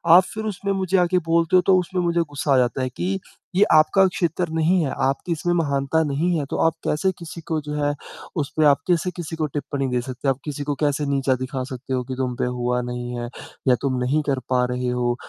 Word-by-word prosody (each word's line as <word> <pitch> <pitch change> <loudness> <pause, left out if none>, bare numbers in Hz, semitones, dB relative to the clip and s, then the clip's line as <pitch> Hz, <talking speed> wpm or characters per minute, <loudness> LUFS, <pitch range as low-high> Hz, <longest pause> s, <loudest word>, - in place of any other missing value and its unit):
आप 185 - +8
फिर 220 0 -4
उसमें 200 -1 -2
मुझे 190 0 +1
आके 180 0 +3
बोलते 170 +2 +3
हो 180 - +7
तो 190 - +6
उसमें 180 0 -2
मुझे 170 0 +1
ग़ुस्सा 145 -2 -1
आ - - +5
जाता 125 +1 +1
है 130 - -1
कि 190 +9 -2 0.4
ये 200 - +6
आपका 190 +5 +5
क्षेत्र 175 -1 -1
नहीं 165 +3 +2
है। 140 - -1 0.2
आपकी 140 +6 -2
इसमें 175 +2 0
महानता 145 0 +1
नहीं 160 +4 0
है, 145 - -1
तो - - -2
आप 165 - +1
कैसे 190 +5 +1
किसी 170 0 -8
को 155 - +2
जो 150 0 -6
है 145 0 +2 0.5
उसपे 155 +2 0
आप 140 0 +5
कैसे 180 +1 +1
किसी 165 -2 -5
को 155 -1 -1
टिप्पणी 140 -1 -3
दे 125 -1 +1
सकते 130 +2 -5
हो। 135 - +4
आप 130 - -19
किसी 145 -1 -4
को 145 - +1
कैसे 145 0 +1
नीचा 135 -2 +1
दिखा 130 0 -3
सकते 130 +1 -5
हो 125 - 0
कि 130 +1 -5
तुम 125 -2 -1
पे - - -1
हुआ 125 0 0
नहीं 125 0 -5
है? 120 0 -4 0.4
या 125 - +6
तुम 135 -2 0
नहीं 145 +5 +2
कर 135 -2 +1
पा 125 -1 +3
रहे 125 0 -1
हो 120 0 0
145 Hz, 245 wpm, -23 LUFS, 130-170 Hz, 0.5 s, आप